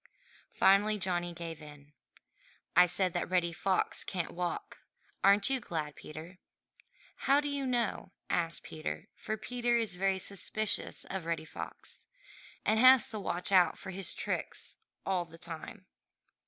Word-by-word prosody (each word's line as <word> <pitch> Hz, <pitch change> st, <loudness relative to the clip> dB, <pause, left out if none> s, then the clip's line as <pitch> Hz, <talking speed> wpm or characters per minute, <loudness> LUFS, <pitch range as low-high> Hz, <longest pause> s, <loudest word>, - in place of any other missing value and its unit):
Finally 205 Hz, +2 st, +4 dB
Johnny 175 Hz, -2 st, -1 dB
gave 165 Hz, -2 st, -7 dB
in. 145 Hz, -1 st, -12 dB, 0.8 s
"I 180 Hz, +1 st, +8 dB
said 185 Hz, 0 st, +1 dB
that 175 Hz, -, -1 dB
Reddy 175 Hz, -2 st, +2 dB
Fox 190 Hz, +3 st, 0 dB
can't 180 Hz, -3 st, -3 dB
walk. 180 Hz, -, -4 dB, 0.4 s
Aren't 200 Hz, +5 st, +5 dB
you 265 Hz, -, +2 dB
glad, 155 Hz, -8 st, -4 dB
Peter?" 160 Hz, +4 st, -10 dB, 0.9 s
"How 275 Hz, +1 st, +6 dB
do 290 Hz, -, -2 dB
you 280 Hz, -2 st, -1 dB
know?" 235 Hz, -6 st, 0 dB, 0.2 s
asked 165 Hz, -1 st, 0 dB
Peter, 80 Hz, -, -5 dB
for 215 Hz, 0 st, -4 dB
Peter 240 Hz, +2 st, 0 dB
is 225 Hz, -5 st, -1 dB
very 195 Hz, 0 st, +2 dB
suspicious 200 Hz, +3 st, -2 dB
of 190 Hz, -3 st, -4 dB
Reddy 165 Hz, -1 st, -2 dB
Fox, -, -, -8 dB, 0.6 s
and 220 Hz, 0 st, +3 dB
has 255 Hz, -1 st, +8 dB
to 215 Hz, -, -3 dB
watch 180 Hz, -1 st, -2 dB
out 180 Hz, -3 st, +5 dB
for 190 Hz, -, -7 dB
his 190 Hz, +1 st, -3 dB
tricks -, -, -3 dB, 0.3 s
all 185 Hz, -2 st, +1 dB
the 165 Hz, -1 st, -14 dB
time. 170 Hz, +4 st, -8 dB
185 Hz, 145 wpm, -32 LUFS, 170-215 Hz, 0.9 s, I